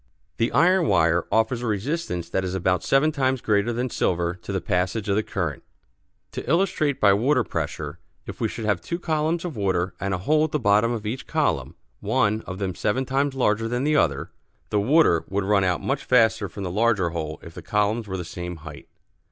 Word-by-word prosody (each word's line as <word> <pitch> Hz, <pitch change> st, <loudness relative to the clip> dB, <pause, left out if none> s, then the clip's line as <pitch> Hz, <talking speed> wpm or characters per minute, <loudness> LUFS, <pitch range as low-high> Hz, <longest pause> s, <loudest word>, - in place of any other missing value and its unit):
The 115 Hz, -, +1 dB
iron 180 Hz, 0 st, +4 dB
wire 85 Hz, +1 st, +3 dB
offers 115 Hz, +2 st, +1 dB
a 120 Hz, -, -3 dB
resistance 105 Hz, -, -2 dB
that 95 Hz, +2 st, -1 dB
is 95 Hz, 0 st, -3 dB
about 90 Hz, -1 st, +1 dB
seven 140 Hz, +3 st, +3 dB
times 130 Hz, -3 st, 0 dB
greater 105 Hz, +1 st, +1 dB
than 120 Hz, +1 st, -2 dB
silver 85 Hz, -1 st, 0 dB
to -, -, -7 dB
the 95 Hz, -, 0 dB
passage 90 Hz, +5 st, -1 dB
of 100 Hz, -, +1 dB
the 105 Hz, -, +2 dB
current. 85 Hz, -9 st, -3 dB, 0.7 s
To -, -, -6 dB
illustrate 165 Hz, -4 st, +1 dB
by 100 Hz, -1 st, +5 dB
water 125 Hz, +5 st, +2 dB
pressure: 75 Hz, -5 st, -4 dB, 0.3 s
If -, -, -8 dB
we -, -, +2 dB
should 110 Hz, -, -6 dB
have 105 Hz, -5 st, +1 dB
two 170 Hz, -, -3 dB
columns 165 Hz, 0 st, -1 dB
of 165 Hz, -6 st, -5 dB
water, 95 Hz, -3 st, 0 dB
and 95 Hz, +1 st, -2 dB
a 95 Hz, -, 0 dB
hole 150 Hz, +12 st, +2 dB
at 155 Hz, -, -2 dB
the 150 Hz, -, +1 dB
bottom 105 Hz, 0 st, +3 dB
of 115 Hz, -3 st, -4 dB
each 115 Hz, +5 st, -4 dB
column, -, -, 0 dB, 0.2 s
one 110 Hz, +1 st, +1 dB
of 95 Hz, -, -5 dB
them 95 Hz, -2 st, -2 dB
seven 125 Hz, +9 st, -1 dB
times 135 Hz, +1 st, 0 dB
larger 115 Hz, -3 st, +1 dB
than 120 Hz, +2 st, -1 dB
the 150 Hz, +1 st, +2 dB
other, 70 Hz, -, +1 dB, 0.4 s
the 105 Hz, -, +2 dB
water 120 Hz, -, +4 dB
would 100 Hz, +1 st, -1 dB
run 100 Hz, 0 st, +2 dB
out 90 Hz, -2 st, 0 dB
much 135 Hz, +1 st, -1 dB
faster 110 Hz, -5 st, +3 dB
from 100 Hz, +3 st, -7 dB
the 90 Hz, -, -3 dB
larger 105 Hz, -4 st, +2 dB
hole 80 Hz, -2 st, -4 dB
if 80 Hz, -, -11 dB
the -, -, -9 dB
columns 105 Hz, +2 st, 0 dB
were 95 Hz, -1 st, -4 dB
the 90 Hz, -, -5 dB
same 90 Hz, +1 st, -6 dB
height. 80 Hz, -1 st, -11 dB
105 Hz, 215 wpm, -24 LUFS, 90-130 Hz, 0.7 s, by